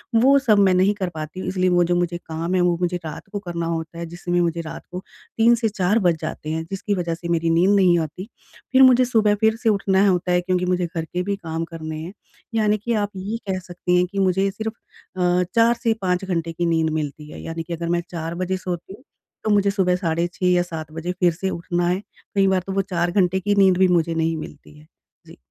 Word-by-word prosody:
वो 265 Hz, +5 st, +6 dB
सब 220 Hz, -6 st, +3 dB
मैं 195 Hz, -2 st, +5 dB
नहीं 190 Hz, +3 st, +3 dB
कर 190 Hz, -3 st, -2 dB
पाती 155 Hz, +3 st, -6 dB
हूँ -, -, -5 dB
इसलिए 185 Hz, -1 st, +1 dB
वो 175 Hz, -1 st, +4 dB
जो 175 Hz, +1 st, +1 dB
मुझे 175 Hz, -1 st, 0 dB
काम 165 Hz, +2 st, -3 dB
है 185 Hz, -, +3 dB
वो 175 Hz, -1 st, +2 dB
मुझे 180 Hz, 0 st, 0 dB
रात 155 Hz, -, -7 dB
को 205 Hz, -, -3 dB
करना 170 Hz, -3 st, -4 dB
होता 165 Hz, 0 st, -4 dB
है, 170 Hz, -, -4 dB
जिसमें 175 Hz, +1 st, -2 dB
मुझे 170 Hz, -1 st, 0 dB
रात 160 Hz, -, -8 dB
को 180 Hz, +1 st, -6 dB, 0.3 s
3 230 Hz, +1 st, +5 dB
से 225 Hz, -1 st, 0 dB
4 200 Hz, +2 st, +1 dB
बज 175 Hz, -5 st, +2 dB
जाते 155 Hz, -, -5 dB
हैं 160 Hz, 0 st, -2 dB
जिसकी 195 Hz, +1 st, -2 dB
वजह 170 Hz, -2 st, -2 dB
से 170 Hz, +1 st, -8 dB
मेरी 165 Hz, -1 st, +1 dB
नींद 175 Hz, +5 st, +4 dB
नहीं 185 Hz, -3 st, +5 dB
आती। 165 Hz, +5 st, -5 dB, 0.4 s
फिर 260 Hz, 0 st, +5 dB
मुझे 255 Hz, -1 st, +6 dB
सुबह 220 Hz, -4 st, +3 dB
फिर 220 Hz, 0 st, +4 dB
से 225 Hz, -, +4 dB
उठना 195 Hz, -1 st, +3 dB
होता 180 Hz, -1 st, +1 dB
है, 180 Hz, -, +3 dB
क्योंकि 180 Hz, 0 st, 0 dB
मुझे 180 Hz, 0 st, 0 dB
घर 165 Hz, -1 st, -4 dB
के 180 Hz, +3 st, -3 dB
भी 200 Hz, +2 st, -1 dB
काम 165 Hz, -4 st, -4 dB
करने 160 Hz, -2 st, -6 dB
हैं। 170 Hz, +4 st, -7 dB, 0.4 s
यानी 215 Hz, -1 st, +2 dB
कि 230 Hz, +3 st, -2 dB
आप 205 Hz, -2 st, 0 dB
ये 200 Hz, +4 st, -4 dB
कह 190 Hz, -1 st, -1 dB
सकती 180 Hz, 0 st, -2 dB
हैं 180 Hz, -, +3 dB
कि 200 Hz, -, -3 dB
मुझे 190 Hz, +1 st, +2 dB
सिर्फ़ 220 Hz, +2 st, -4 dB, 0.4 s
अ, 180 Hz, 0 st, +2 dB
4 230 Hz, +1 st, +5 dB
से 230 Hz, -2 st, +3 dB
5 180 Hz, 0 st, 0 dB
घंटे 170 Hz, -3 st, -2 dB
की 175 Hz, +1 st, -2 dB
नींद 165 Hz, -1 st, +1 dB
मिलती 150 Hz, -1 st, -4 dB
है। -, -, -9 dB
यानी 165 Hz, 0 st, -5 dB
कि 170 Hz, -, -6 dB
अगर 170 Hz, 0 st, -4 dB
मैं 170 Hz, 0 st, +1 dB
4 165 Hz, -1 st, -4 dB
बजे 185 Hz, +1 st, -2 dB
सोती 180 Hz, 0 st, -5 dB
हूँ, 255 Hz, -, -15 dB, 0.4 s
तो -, -, -1 dB
मुझे 200 Hz, -1 st, +3 dB
सुबह 190 Hz, -3 st, +2 dB
साढ़े 170 Hz, -2 st, 0 dB
6 185 Hz, -, -3 dB
या 175 Hz, -, +3 dB
7 160 Hz, -3 st, -7 dB
बजे 165 Hz, +3 st, -4 dB
फिर 175 Hz, -2 st, +3 dB
से 190 Hz, +4 st, -3 dB
उठना 175 Hz, 0 st, -2 dB
है। 180 Hz, +2 st, +1 dB, 0.4 s
कई 195 Hz, -1 st, +4 dB
बार 190 Hz, -1 st, +2 dB
तो 195 Hz, -, -3 dB
वो 195 Hz, -, +2 dB
4 175 Hz, -2 st, -1 dB
घंटे 190 Hz, 0 st, +2 dB
की 205 Hz, +2 st, 0 dB
नींद 190 Hz, -2 st, +5 dB
भी 190 Hz, 0 st, +5 dB
मुझे 170 Hz, -2 st, +2 dB
नहीं 165 Hz, 0 st, 0 dB
मिलती 150 Hz, -1 st, -10 dB
है। 150 Hz, +1 st, -18 dB, 0.4 s
जी। -, -, -14 dB
180 Hz, 250 wpm, -22 LUFS, 170-195 Hz, 0.4 s, वो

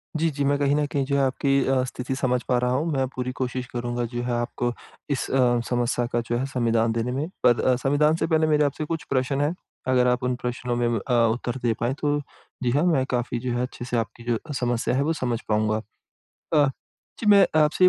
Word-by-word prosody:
जी, 165 Hz, +1 st, +2 dB
जी 140 Hz, 0 st, -2 dB
मैं 140 Hz, 0 st, +2 dB
कहीं 145 Hz, 0 st, +2 dB
न 150 Hz, 0 st, +2 dB
कहीं 140 Hz, -2 st, 0 dB
जो 140 Hz, 0 st, 0 dB
आपकी 135 Hz, +1 st, +2 dB
अ, 130 Hz, -1 st, +2 dB
स्थिति 130 Hz, +1 st, -4 dB
समझ 125 Hz, -2 st, 0 dB
पा 125 Hz, -, +2 dB
रहा 125 Hz, 0 st, +1 dB
हूँ। 140 Hz, +6 st, +1 dB
मैं 135 Hz, -1 st, +1 dB
पूरी 125 Hz, 0 st, -2 dB
कोशिश 130 Hz, -1 st, -2 dB
करूँगा 120 Hz, 0 st, -2 dB
जो 120 Hz, -, -2 dB
है 125 Hz, -, -1 dB
आपको 120 Hz, 0 st, -2 dB, 0.4 s
इस 140 Hz, -, -1 dB
अ, 125 Hz, -2 st, +3 dB
समस्या 120 Hz, 0 st, 0 dB
का 120 Hz, -, +2 dB
जो 120 Hz, -, +1 dB
है 130 Hz, -, -1 dB
संविधान 115 Hz, -3 st, +1 dB
देने 115 Hz, +2 st, -1 dB
में। 140 Hz, +5 st, -2 dB, 0.2 s
पर 120 Hz, -1 st, +5 dB
अ, 130 Hz, -, +3 dB
संविधान 145 Hz, +4 st, +2 dB
से 165 Hz, -, -1 dB
पहले 160 Hz, -1 st, +2 dB
मेरे 150 Hz, -1 st, +3 dB
आपसे 145 Hz, +2 st, -2 dB
कुछ 165 Hz, 0 st, -3 dB
प्रश्न 135 Hz, +1 st, 0 dB
हैं 150 Hz, +4 st, +1 dB, 0.3 s
अगर 125 Hz, -1 st, +3 dB
आप 125 Hz, 0 st, +1 dB
उन 125 Hz, 0 st, 0 dB
प्रश्नों 125 Hz, 0 st, -2 dB
में 120 Hz, 0 st, +1 dB, 0.2 s
अ, 125 Hz, -, +1 dB, 0.2 s
उत्तर 120 Hz, +2 st, -3 dB
दे 115 Hz, -2 st, +2 dB
पाएँ 120 Hz, +3 st, 0 dB
तो 145 Hz, 0 st, +1 dB, 0.4 s
जी 120 Hz, -, +2 dB
हाँ 145 Hz, +4 st, +2 dB
मैं 140 Hz, -7 st, +3 dB
काफ़ी 120 Hz, -1 st, -1 dB
जो 125 Hz, +1 st, -3 dB
है -, -, 0 dB
अच्छे 125 Hz, -1 st, -5 dB
से 125 Hz, -1 st, -1 dB
आपकी 115 Hz, +1 st, -4 dB
जो 120 Hz, -2 st, 0 dB, 0.2 s
समस्या 120 Hz, 0 st, 0 dB
है 135 Hz, -, +2 dB
वो 160 Hz, +3 st, +1 dB
समझ 120 Hz, -6 st, -2 dB
पाऊँगा। 110 Hz, 0 st, +1 dB, 0.7 s
अ, 145 Hz, -2 st, +5 dB, 0.5 s
जी 220 Hz, -, -3 dB
मैं 200 Hz, -2 st, +7 dB
आपसे 155 Hz, +4 st, +4 dB
ये -, -, +9 dB
125 Hz, 235 wpm, -25 LUFS, 120-140 Hz, 0.7 s, ये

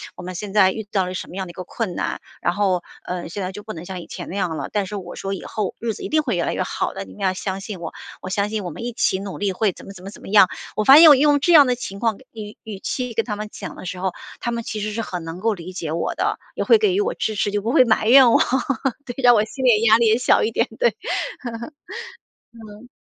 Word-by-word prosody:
“我 -, -, -9 dB
们 180 Hz, 0 st, -6 dB
现 205 Hz, +2 st, -5 dB
在 190 Hz, -3 st, +5 dB
遇 220 Hz, -, -5 dB
到 190 Hz, -3 st, +1 dB
了 185 Hz, -, -5 dB
什 185 Hz, -, -5 dB
么 180 Hz, -, -10 dB
样 190 Hz, -, -2 dB
的 -, -, -8 dB
一 -, -, -18 dB
个 185 Hz, -, -7 dB
困 185 Hz, 0 st, -4 dB
难， -, -, -2 dB, 0.2 s
然 175 Hz, -, +1 dB
后， 190 Hz, -3 st, +1 dB, 0.2 s
呃， 180 Hz, -2 st, -4 dB
现 200 Hz, +3 st, -5 dB
在 185 Hz, +1 st, -4 dB
就 205 Hz, -, -8 dB
不 215 Hz, -, -7 dB
能 170 Hz, -3 st, -8 dB
像 185 Hz, -1 st, -6 dB
以 -, -, -10 dB
前 -, -, -7 dB
那 190 Hz, -, -6 dB
样 180 Hz, -5 st, -1 dB
了，” -, -, -4 dB
但 205 Hz, -2 st, +1 dB
是 205 Hz, +2 st, -5 dB
我 180 Hz, -2 st, -8 dB
说： 195 Hz, -, -4 dB
“以 195 Hz, -, -6 dB
后 210 Hz, -4 st, -3 dB
日 230 Hz, -1 st, -2 dB
子 -, -, -9 dB
一 -, -, -4 dB
定 310 Hz, 0 st, +3 dB
会 240 Hz, -9 st, -1 dB
越 170 Hz, -, 0 dB
来 -, -, -1 dB
越 -, -, -2 dB
好 -, -, -2 dB
的， 95 Hz, -, -6 dB
你 95 Hz, -, -13 dB
们 -, -, -13 dB
要 190 Hz, -1 st, +2 dB
相 190 Hz, +1 st, -4 dB
信 195 Hz, -3 st, -7 dB
我， 165 Hz, -, -6 dB, 0.3 s
我 185 Hz, -, -6 dB
相 200 Hz, +2 st, 0 dB
信 215 Hz, -3 st, -3 dB
我 -, -, -3 dB
们 170 Hz, -, -8 dB
一 245 Hz, -, -3 dB
起 190 Hz, -4 st, +1 dB
努 195 Hz, -1 st, -6 dB
力， 200 Hz, -2 st, -1 dB
会 210 Hz, +1 st, +1 dB
怎 -, -, -14 dB
么 195 Hz, -, -9 dB
怎 185 Hz, -1 st, -13 dB
么 195 Hz, -, -7 dB
怎 -, -, -14 dB
么 -, -, -11 dB
样。” 195 Hz, -2 st, +6 dB, 0.3 s
我 215 Hz, -, +1 dB
发 275 Hz, +7 st, +9 dB
现 330 Hz, -, +10 dB
我 290 Hz, -, +9 dB
用 290 Hz, +1 st, +4 dB
这 345 Hz, +4 st, +3 dB
样 295 Hz, -3 st, +9 dB
的 250 Hz, -, +2 dB
情 230 Hz, -5 st, -7 dB
况 225 Hz, -3 st, +1 dB, 0.2 s
语 215 Hz, -2 st, -8 dB
语 210 Hz, -3 st, -7 dB
气 250 Hz, +2 st, -3 dB
跟 225 Hz, 0 st, +1 dB
他 210 Hz, -3 st, -4 dB
们 215 Hz, 0 st, -5 dB
讲 -, -, -8 dB
的 -, -, -9 dB
时 180 Hz, +1 st, -5 dB
候， 190 Hz, -1 st, -1 dB, 0.3 s
他 240 Hz, -, -2 dB
们 235 Hz, 0 st, -2 dB
其 215 Hz, -1 st, -4 dB
实 210 Hz, 0 st, -2 dB
是 230 Hz, -, -3 dB
很 180 Hz, -6 st, -5 dB
能 165 Hz, +2 st, -7 dB
够 225 Hz, +2 st, +1 dB
理 180 Hz, -1 st, -8 dB
解 165 Hz, -4 st, -4 dB
我 170 Hz, -, -1 dB
的， -, -, 0 dB, 0.2 s
也 -, -, -2 dB
会 460 Hz, -, +7 dB
给 420 Hz, -4 st, +2 dB
予 395 Hz, -, +1 dB
我 450 Hz, +4 st, 0 dB
支 215 Hz, -, -2 dB
持， 205 Hz, -, 0 dB
就 205 Hz, 0 st, -1 dB
不 225 Hz, -, -1 dB
会 255 Hz, -3 st, +6 dB
埋 220 Hz, -1 st, +2 dB
怨 260 Hz, -1 st, +8 dB
我， -, -, +5 dB, 0.7 s
对， 245 Hz, -, -6 dB
让 245 Hz, -, +8 dB
我 210 Hz, -, +3 dB
心 260 Hz, +4 st, -7 dB
理 230 Hz, -4 st, +4 dB
压 220 Hz, 0 st, +6 dB
力 235 Hz, -, +3 dB
也 220 Hz, +1 st, +4 dB
小 250 Hz, -, +3 dB
一 225 Hz, -, 0 dB
点， -, -, +1 dB
对。 485 Hz, -, +4 dB, 1.8 s
嗯。 215 Hz, +4 st, -14 dB
205 Hz, 330 characters per minute, -22 LUFS, 185-230 Hz, 1.8 s, 现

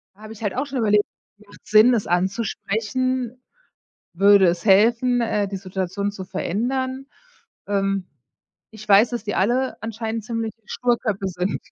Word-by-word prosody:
Habe 215 Hz, +2 st, -11 dB
ich 225 Hz, -, -13 dB
halt 205 Hz, -3 st, -2 dB
auch 265 Hz, +3 st, -2 dB
schon 275 Hz, -1 st, -4 dB
überlegt: 210 Hz, -2 st, +3 dB, 0.4 s
Macht 200 Hz, -, -17 dB
es -, -, -17 dB
Sinn, 220 Hz, +4 st, +6 dB
es 215 Hz, -, -1 dB
anzusprechen? 230 Hz, +6 st, -2 dB, 0.7 s
Würde 195 Hz, +1 st, +5 dB
es 170 Hz, 0 st, 0 dB
helfen, 230 Hz, +5 st, +4 dB
äh, 210 Hz, -3 st, 0 dB
die 195 Hz, -, -5 dB
Situation 190 Hz, +1 st, -3 dB
zu 190 Hz, -2 st, -7 dB
verändern? 260 Hz, +9 st, -3 dB, 0.6 s
Ähm, 195 Hz, -2 st, -1 dB, 0.6 s
ich 215 Hz, -1 st, -12 dB
weiß, 205 Hz, +4 st, +6 dB
dass 235 Hz, -2 st, -4 dB
die 205 Hz, -, -3 dB
alle 245 Hz, +7 st, +1 dB
anscheinend 225 Hz, 0 st, -4 dB
ziemliche 225 Hz, -1 st, -4 dB
Sturköpfe 230 Hz, -5 st, -1 dB
sind. 180 Hz, +1 st, -2 dB
215 Hz, 150 wpm, -22 LUFS, 195-240 Hz, 0.7 s, Sinn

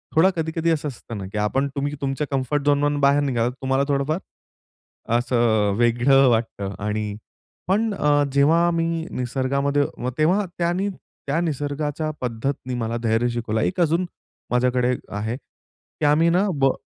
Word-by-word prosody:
थोडा 165 Hz, +4 st, +6 dB
कधी-कधी 160 Hz, 0 st, -1 dB
असं 155 Hz, -2 st, -1 dB
असतं 120 Hz, -4 st, -7 dB
ना 100 Hz, -, -5 dB
की 105 Hz, -, -5 dB
आपण 120 Hz, +7 st, +1 dB
तुम्ही 145 Hz, +1 st, -2 dB
तुमच्या 135 Hz, +2 st, -1 dB
कम्फर्ट 135 Hz, +2 st, 0 dB
झोन 145 Hz, 0 st, +2 dB
वरून 145 Hz, 0 st, +1 dB
बाहेर 140 Hz, +1 st, +4 dB
निघालात, 120 Hz, -3 st, 0 dB
तर -, -, -16 dB
तुम्हाला 135 Hz, +1 st, +1 dB
थोडंफार 145 Hz, +3 st, 0 dB, 1.0 s
असं 115 Hz, -4 st, +2 dB
वेगळं 120 Hz, +3 st, +4 dB
वाटतं 110 Hz, -4 st, -1 dB
आणि 105 Hz, +1 st, -1 dB, 0.6 s
पण 210 Hz, +4 st, +1 dB
अ, 145 Hz, -5 st, +2 dB
जेव्हा 160 Hz, +5 st, +4 dB
मी 165 Hz, -1 st, 0 dB, 0.3 s
निसर्गामध्ये 140 Hz, +3 st, 0 dB, 0.3 s
तेव्हा 180 Hz, +7 st, +3 dB
त्यांनी 175 Hz, +3 st, 0 dB
त्या 165 Hz, -5 st, -5 dB
निसर्गाच्या 150 Hz, 0 st, -2 dB
पद्धतीने 125 Hz, +1 st, -3 dB
मला 115 Hz, 0 st, -2 dB
धैर्य 115 Hz, +2 st, +2 dB
शिकवलं, 115 Hz, -2 st, -2 dB
एक 185 Hz, -, -1 dB
अजून 170 Hz, +2 st, +2 dB, 0.5 s
माझ्याकडे 125 Hz, 0 st, +2 dB, 0.2 s
आहे 110 Hz, +3 st, -3 dB
की 150 Hz, -, -10 dB
आम्ही 155 Hz, +3 st, +4 dB
ना 185 Hz, +4 st, +2 dB
ब 135 Hz, 0 st, +5 dB
140 Hz, 150 wpm, -23 LUFS, 120-155 Hz, 1.0 s, थोडा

